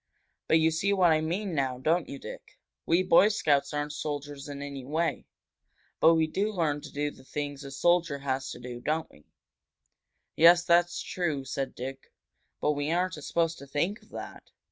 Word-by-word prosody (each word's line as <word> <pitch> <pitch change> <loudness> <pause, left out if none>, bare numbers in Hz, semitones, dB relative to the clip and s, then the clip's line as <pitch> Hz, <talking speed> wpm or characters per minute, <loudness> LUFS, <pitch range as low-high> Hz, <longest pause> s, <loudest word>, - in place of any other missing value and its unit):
"But 160 - +5
you 160 0 +3
see 195 +6 +1
what 180 -4 +4
I 155 0 +3
mean 180 +4 -2
now, 135 -4 0
don't 160 +6 +1
you, 140 - -6
Dick? - - -10 0.3
We 170 +3 +3
Boy 185 +2 +6
Scouts 145 -9 +1
aren't 145 0 -3
soldiers 145 -1 -5
in 140 0 -6
any 140 -2 -6
way. 155 +2 -1 0.7
But 165 +1 +6
we 160 -1 +3
do 200 +7 -1
learn 155 -7 0
to - - -10
do 145 +1 -2
the 130 - -16
things 145 +1 -5
a 140 - -7
soldier 165 +2 +2
has 135 -1 -2
to - - -7
do, 120 0 -7
don't 155 +3 -1
we?" 75 - -21 1.1
"Yes, 175 +2 +7
that's 175 0 +2
true," 155 -7 -2
said 135 0 -4
Dick. 135 +2 -7 0.5
"But - - +2
we 145 0 -2
aren't 175 -2 -1
supposed 165 +1 0
to 140 - -11
think 170 +10 -1
of - - -22
that." - - -9
150 Hz, 190 wpm, -28 LUFS, 140-170 Hz, 1.1 s, Yes